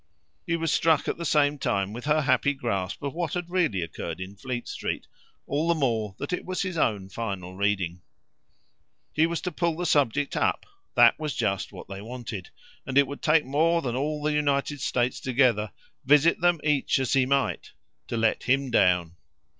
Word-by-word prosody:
He 170 Hz, -, +1 dB
was 165 Hz, -2 st, 0 dB
struck 160 Hz, -3 st, +3 dB
at -, -, -1 dB
the 170 Hz, -, -3 dB
same 145 Hz, -1 st, +2 dB
time 100 Hz, -5 st, -1 dB
with 120 Hz, +3 st, -7 dB
her 155 Hz, +1 st, +3 dB
happy 140 Hz, +1 st, +2 dB
grasp 105 Hz, -7 st, -3 dB
of 140 Hz, -, -3 dB
what 170 Hz, -1 st, -2 dB
had 175 Hz, -1 st, -4 dB
really 160 Hz, -, +1 dB
occurred 80 Hz, +1 st, -6 dB
in 95 Hz, +2 st, -7 dB
Fleet 120 Hz, +2 st, -5 dB
Street -, -, -4 dB, 0.4 s
all 150 Hz, +4 st, -1 dB
the 170 Hz, -, +3 dB
more 115 Hz, -9 st, -1 dB
that -, -, -4 dB
it -, -, -2 dB
was 185 Hz, +1 st, -2 dB
his 185 Hz, -2 st, -4 dB
own 105 Hz, -, 0 dB
final 95 Hz, -3 st, -5 dB
reading. 95 Hz, -3 st, -1 dB, 1.1 s
He 160 Hz, +1 st, +3 dB
was 170 Hz, 0 st, -3 dB
to 180 Hz, -, -3 dB
pull 170 Hz, -3 st, -1 dB
the 175 Hz, -, -2 dB
subject 145 Hz, -3 st, +1 dB
up -, -, 0 dB, 0.3 s
that -, -, +6 dB
was 155 Hz, -3 st, -3 dB
just 95 Hz, -1 st, -1 dB
what -, -, -10 dB
they 100 Hz, 0 st, -7 dB
wanted; 110 Hz, -5 st, -7 dB, 0.3 s
and 135 Hz, 0 st, -2 dB
it 140 Hz, -, +7 dB
would 140 Hz, +2 st, -8 dB
take 155 Hz, -1 st, +3 dB
more 165 Hz, +5 st, +2 dB
than 120 Hz, -2 st, -2 dB
all 150 Hz, +3 st, -2 dB
the 150 Hz, 0 st, +1 dB
United 145 Hz, -1 st, 0 dB
States 125 Hz, -1 st, 0 dB
together, 120 Hz, -5 st, +2 dB, 0.3 s
visit 150 Hz, +5 st, +4 dB
them 175 Hz, -1 st, +3 dB
each 150 Hz, -2 st, +2 dB
as 130 Hz, -2 st, 0 dB
he 130 Hz, -2 st, +3 dB
might, 140 Hz, 0 st, 0 dB, 0.3 s
to 115 Hz, -, -3 dB
let 115 Hz, -1 st, +1 dB
HIM 135 Hz, 0 st, +1 dB
down. 90 Hz, -5 st, +2 dB
135 Hz, 195 wpm, -26 LUFS, 105-155 Hz, 1.1 s, it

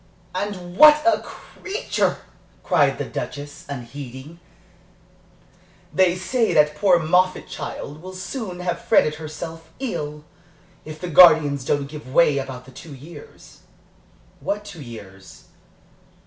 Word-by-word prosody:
"And 185 Hz, -3 st, -5 dB
what 300 Hz, 0 st, +9 dB
a 340 Hz, -, +4 dB
creature!" 410 Hz, +5 st, -3 dB, 0.5 s
cried -, -, +2 dB
the -, -, -3 dB
Duchess, 145 Hz, 0 st, -7 dB
unheeding. 135 Hz, +4 st, -8 dB, 1.5 s
"They 185 Hz, -2 st, +3 dB
say 225 Hz, +6 st, 0 dB
that 150 Hz, 0 st, +4 dB
poor 190 Hz, 0 st, +4 dB
Moffatt 180 Hz, +3 st, +1 dB
child 150 Hz, +2 st, -7 dB
will 185 Hz, +1 st, -9 dB
soon 190 Hz, -1 st, -6 dB
have 175 Hz, -1 st, -2 dB
fretted 150 Hz, -, +3 dB
herself 160 Hz, +1 st, -8 dB
ill, 150 Hz, -, -4 dB, 0.6 s
if 155 Hz, 0 st, -9 dB
the 180 Hz, -, -5 dB
guardians 155 Hz, -5 st, +6 dB
don't 145 Hz, +1 st, 0 dB
give 150 Hz, -2 st, -10 dB
way 145 Hz, -2 st, +4 dB
about 130 Hz, -2 st, -7 dB
the 130 Hz, -, -14 dB
two 145 Hz, +3 st, -11 dB
years." 170 Hz, -, -14 dB, 0.8 s
"What 205 Hz, +1 st, -3 dB
two 200 Hz, -6 st, -10 dB
years?" 100 Hz, -6 st, -12 dB
160 Hz, 120 wpm, -22 LUFS, 145-185 Hz, 1.5 s, what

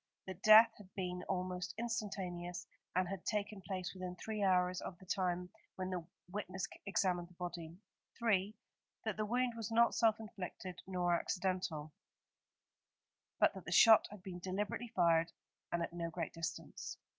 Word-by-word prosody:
That 190 Hz, -1 st, -7 dB
death 220 Hz, +1 st, +9 dB
had 190 Hz, -2 st, -14 dB
been 180 Hz, -2 st, -2 dB
almost 180 Hz, 0 st, -2 dB
instantaneous, 190 Hz, -6 st, -3 dB, 0.3 s
and 185 Hz, 0 st, +2 dB
had 195 Hz, -1 st, -5 dB
taken 210 Hz, -1 st, -2 dB
place 185 Hz, -1 st, -4 dB
within 185 Hz, -1 st, -5 dB
three 215 Hz, +3 st, -4 dB
hours 180 Hz, -2 st, +3 dB
of 175 Hz, -, -6 dB
the 185 Hz, -, -15 dB
time 180 Hz, -1 st, -1 dB, 0.2 s
when 185 Hz, 0 st, -3 dB
the 175 Hz, -3 st, -3 dB, 0.2 s
witness 190 Hz, 0 st, -3 dB, 0.2 s
examined 180 Hz, -3 st, +1 dB
the 180 Hz, -, -20 dB
body. 175 Hz, -2 st, -6 dB, 0.4 s
3. 210 Hz, -3 st, +2 dB, 0.5 s
That 220 Hz, -3 st, 0 dB
the 215 Hz, 0 st, -1 dB
wound 245 Hz, +2 st, +1 dB
was 225 Hz, -1 st, -4 dB
not 235 Hz, +1 st, +5 dB
self 225 Hz, -1 st, +3 dB
inflicted 190 Hz, -3 st, -7 dB
nor 180 Hz, -2 st, +1 dB
accidental; 180 Hz, -4 st, -1 dB, 1.5 s
but -, -, +5 dB
that -, -, -9 dB
the -, -, -5 dB
shot 225 Hz, -2 st, +8 dB
had 210 Hz, -3 st, -11 dB
been 180 Hz, -2 st, -6 dB
deliberately 195 Hz, +6 st, -2 dB
fired 170 Hz, -6 st, +3 dB, 0.4 s
and 170 Hz, 0 st, +1 dB
at 170 Hz, -, -4 dB
no 170 Hz, -1 st, -2 dB
great 165 Hz, -1 st, -4 dB
distance. 165 Hz, -1 st, -5 dB
185 Hz, 155 wpm, -36 LUFS, 180-210 Hz, 1.5 s, death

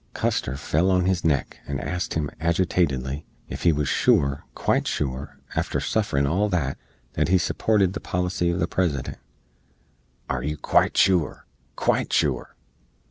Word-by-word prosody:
Custar 65 Hz, +2 st, -1 dB
fell 80 Hz, +5 st, +1 dB
on 90 Hz, -1 st, +3 dB
his 95 Hz, -1 st, +1 dB
neck, 75 Hz, -5 st, 0 dB
and 70 Hz, -2 st, -2 dB
asked 90 Hz, 0 st, -3 dB
him, 75 Hz, -3 st, -1 dB
aggitatidly, 80 Hz, -5 st, 0 dB, 0.3 s
ef -, -, -5 dB
he 85 Hz, -, +5 dB
wuz 75 Hz, -1 st, 0 dB
shoor 70 Hz, -1 st, +2 dB
quite -, -, +1 dB
shoor, 70 Hz, +1 st, -3 dB, 0.2 s
after -, -, 0 dB
sufferin 75 Hz, -11 st, 0 dB
all 95 Hz, +9 st, +1 dB
that, 75 Hz, -8 st, -1 dB, 0.3 s
that -, -, +1 dB
he 95 Hz, +2 st, +4 dB
supported 95 Hz, +1 st, +1 dB
the -, -, -4 dB
policy 90 Hz, -1 st, -1 dB
of 85 Hz, +1 st, -1 dB
the 85 Hz, -, +2 dB
President? 80 Hz, -10 st, -1 dB, 1.1 s
Are 65 Hz, -2 st, -2 dB
you 75 Hz, +3 st, -3 dB
quite -, -, +2 dB
shoor 90 Hz, -5 st, +3 dB, 0.3 s
quite -, -, +1 dB
shoor? -, -, 0 dB
85 Hz, 150 wpm, -24 LUFS, 70-90 Hz, 1.1 s, he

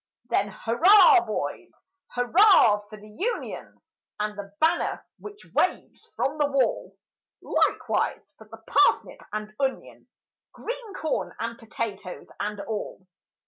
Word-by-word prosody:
Then -, -, +2 dB
hurrah, 375 Hz, -, +6 dB
boys! -, -, -4 dB, 0.5 s
Hurrah 245 Hz, -, +5 dB
for 215 Hz, -, -10 dB
the 210 Hz, -, -14 dB
Union! 405 Hz, -, -5 dB, 0.4 s
And 210 Hz, 0 st, -2 dB
the 200 Hz, -1 st, -8 dB
banner 320 Hz, +1 st, +1 dB
which 415 Hz, 0 st, -11 dB
waves -, -, -1 dB
from 295 Hz, +3 st, -2 dB
the 295 Hz, -, +3 dB
wall; 275 Hz, -2 st, -1 dB, 0.5 s
Likewise 300 Hz, -, 0 dB
for 220 Hz, -, -15 dB
the 225 Hz, +1 st, -13 dB
parsnip 390 Hz, -, +2 dB
and 215 Hz, 0 st, -5 dB
onion, 270 Hz, -1 st, -3 dB, 0.5 s
Green 475 Hz, -4 st, -7 dB
corn 315 Hz, -4 st, -3 dB
and 230 Hz, +1 st, -5 dB
potatoes 210 Hz, -5 st, -6 dB
and 210 Hz, 0 st, -3 dB
all! 210 Hz, -3 st, -6 dB
240 Hz, 120 wpm, -25 LUFS, -, 0.5 s, hurrah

